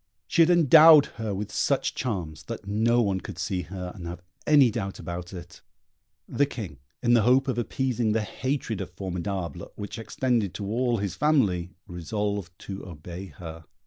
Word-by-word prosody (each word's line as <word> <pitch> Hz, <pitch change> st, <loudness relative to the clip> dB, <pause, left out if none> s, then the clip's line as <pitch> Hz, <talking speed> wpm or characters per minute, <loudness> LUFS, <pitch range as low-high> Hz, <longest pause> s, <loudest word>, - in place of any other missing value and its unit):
She 170 Hz, -, +2 dB
had 165 Hz, -, +6 dB
endowed 160 Hz, -2 st, +8 dB, 0.2 s
her 110 Hz, -2 st, -2 dB
with 100 Hz, +1 st, -4 dB
such -, -, +1 dB
charms 85 Hz, -10 st, -3 dB
that 115 Hz, -3 st, -6 dB
no 115 Hz, +4 st, +3 dB
one 95 Hz, -3 st, 0 dB
could -, -, -8 dB
see 95 Hz, -4 st, -2 dB
her 90 Hz, +1 st, -6 dB
and 90 Hz, -5 st, -8 dB
have 85 Hz, +1 st, -7 dB, 0.2 s
any 145 Hz, -5 st, +6 dB
doubt 100 Hz, -3 st, -4 dB
about 85 Hz, 0 st, -6 dB
it. 90 Hz, -2 st, -10 dB, 0.7 s
The 145 Hz, -, +1 dB
King, 95 Hz, -, -7 dB, 0.2 s
in 120 Hz, 0 st, +4 dB
the 120 Hz, -, +6 dB
hope 130 Hz, +5 st, +4 dB
of 125 Hz, -2 st, 0 dB
appeasing 120 Hz, -2 st, 0 dB
the 110 Hz, -1 st, +1 dB
hatred 120 Hz, -1 st, -3 dB
of 95 Hz, -, -5 dB
Formidable, 90 Hz, -2 st, -5 dB
which 105 Hz, +2 st, -6 dB
extended 115 Hz, -3 st, -1 dB
to 100 Hz, -, -4 dB
all 120 Hz, +3 st, 0 dB
his 100 Hz, -3 st, -2 dB
family, 100 Hz, -, +1 dB
resolved 100 Hz, +1 st, -3 dB
to 95 Hz, 0 st, -7 dB
obey 85 Hz, +3 st, -8 dB
her. 80 Hz, 0 st, -10 dB
100 Hz, 175 wpm, -26 LUFS, 90-120 Hz, 0.7 s, endowed